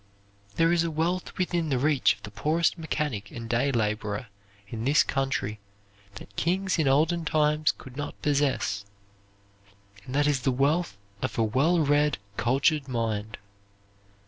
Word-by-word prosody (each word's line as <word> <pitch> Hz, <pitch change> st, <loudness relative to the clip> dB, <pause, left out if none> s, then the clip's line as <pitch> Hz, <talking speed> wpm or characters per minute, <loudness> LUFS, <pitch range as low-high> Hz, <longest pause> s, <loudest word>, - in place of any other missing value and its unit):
There 165 Hz, 0 st, +3 dB
is 170 Hz, -1 st, +3 dB
a 170 Hz, -, -1 dB
wealth 165 Hz, +3 st, -2 dB
within 175 Hz, -3 st, 0 dB
the 135 Hz, -, +1 dB
reach 145 Hz, +1 st, +3 dB
of -, -, -24 dB
the 105 Hz, -, -8 dB
poorest 155 Hz, +9 st, +1 dB
mechanic 150 Hz, -, -3 dB
and 115 Hz, -1 st, -7 dB
day 125 Hz, +4 st, +1 dB
laborer 105 Hz, -1 st, -1 dB, 0.4 s
in 110 Hz, +2 st, -5 dB
this 140 Hz, +5 st, +4 dB
country 135 Hz, -6 st, -2 dB, 0.6 s
that 100 Hz, 0 st, -12 dB
kings 185 Hz, -, 0 dB
in 155 Hz, -, +2 dB
olden 160 Hz, +5 st, +3 dB
times 150 Hz, -1 st, +2 dB
could 130 Hz, -1 st, -13 dB
not 145 Hz, +1 st, -5 dB
possess, 140 Hz, -8 st, +1 dB, 1.2 s
and 125 Hz, -, -7 dB
that 145 Hz, 0 st, +3 dB
is 145 Hz, -2 st, +2 dB
the 130 Hz, +1 st, +1 dB
wealth 140 Hz, -, +1 dB, 0.2 s
of -, -, -3 dB
a 115 Hz, -, +3 dB
well 140 Hz, +10 st, +2 dB
read, 145 Hz, 0 st, +2 dB, 0.2 s
cultured 135 Hz, +5 st, +2 dB
mind. 110 Hz, -3 st, -2 dB
140 Hz, 150 wpm, -27 LUFS, 115-155 Hz, 1.2 s, this